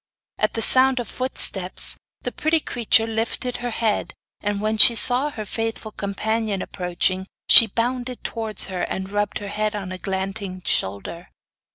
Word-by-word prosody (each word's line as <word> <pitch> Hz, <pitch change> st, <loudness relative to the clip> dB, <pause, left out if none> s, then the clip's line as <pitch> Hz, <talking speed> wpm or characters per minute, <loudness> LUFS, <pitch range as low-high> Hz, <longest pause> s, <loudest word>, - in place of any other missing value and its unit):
At -, -, -1 dB
the 225 Hz, -, 0 dB
sound 260 Hz, +1 st, +5 dB
of 245 Hz, -, -5 dB
footsteps 195 Hz, -7 st, +1 dB, 0.3 s
the -, -, -4 dB
pretty 320 Hz, +1 st, 0 dB
creature 230 Hz, -5 st, +1 dB
lifted 225 Hz, +2 st, -3 dB
her 245 Hz, -, -5 dB
head, 225 Hz, -2 st, -2 dB, 0.2 s
and 205 Hz, -1 st, -3 dB
when 215 Hz, +1 st, -2 dB
she 235 Hz, -, +10 dB
saw 255 Hz, +5 st, +4 dB
her 220 Hz, -7 st, -8 dB
faithful 225 Hz, 0 st, -5 dB
companion 210 Hz, 0 st, -3 dB
approaching 185 Hz, +1 st, -2 dB, 0.2 s
she 230 Hz, -, +9 dB
bounded 245 Hz, +3 st, -4 dB
towards 220 Hz, -3 st, -2 dB
her, 185 Hz, -2 st, -6 dB
and 190 Hz, +1 st, -5 dB
rubbed 205 Hz, 0 st, -2 dB
her 205 Hz, -1 st, -8 dB
head 215 Hz, +1 st, -2 dB
on 195 Hz, -3 st, -6 dB
Eglantine's 190 Hz, 0 st, -6 dB
shoulder. 100 Hz, -, -3 dB
215 Hz, 155 wpm, -21 LUFS, 195-235 Hz, 0.3 s, she